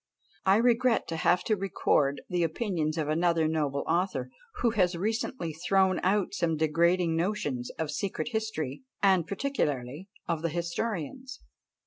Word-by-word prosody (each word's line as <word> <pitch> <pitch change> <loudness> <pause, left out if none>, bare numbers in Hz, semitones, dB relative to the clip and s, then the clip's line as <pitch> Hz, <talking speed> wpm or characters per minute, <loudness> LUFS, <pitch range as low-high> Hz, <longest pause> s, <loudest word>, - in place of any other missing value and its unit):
I 190 - +6
regret 240 +1 +3
to 165 - -2
have 175 +2 +2
to 215 - +1
record 150 -7 +1
the 180 -1 -1
opinions 165 -2 -1
of 155 -2 -1
another 165 +1 +2
noble 150 -3 -1
author, 165 -7 0 0.2
who 235 - +1 0.2
recently 220 -2 -2
has 160 +3 -12
thrown 190 -1 +3
out 195 +1 +1
some 165 -2 0
degrading 170 +2 +2
notions 155 -9 -1
of 160 -2 -2
secret 195 +8 -3
history, 215 - -3 0.2
and 190 -4 +4
particularly 175 - -2 0.2
of 165 -2 -1
the 165 - 0
historians. 185 - -4
170 Hz, 140 wpm, -29 LUFS, 155-200 Hz, 0.2 s, I